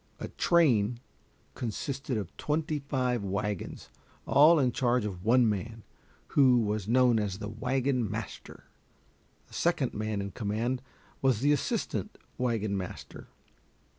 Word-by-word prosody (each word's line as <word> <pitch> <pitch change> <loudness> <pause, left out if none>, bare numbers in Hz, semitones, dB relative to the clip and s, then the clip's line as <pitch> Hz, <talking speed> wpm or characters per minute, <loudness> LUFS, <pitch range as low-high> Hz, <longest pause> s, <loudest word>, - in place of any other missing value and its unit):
A - - -5
train 125 -10 +2 0.5
consisted 130 +2 -3
of 100 -5 -5
twenty 155 0 -1
five 130 -5 -1
wagons, 100 0 -4 0.3
all 155 +4 +6
in 130 -4 +2
charge 120 -2 +1
of 95 -4 -5
one 120 +2 +4
man, 110 +2 -3 0.5
who 130 -3 +5
was 105 -3 -1
known 120 -1 +4
as 100 -3 -2
the 105 0 -5
wagon 125 +1 -1
master. - - -7 0.8
The - - -21
second - - 0
man 110 0 -2
in 100 0 -4
command 115 +5 -2 0.4
was 130 -5 +2
the 145 +2 +3
assistant 145 - -2 0.2
wagon 110 -5 0
master. 95 -2 -7
120 Hz, 130 wpm, -29 LUFS, 105-130 Hz, 0.8 s, all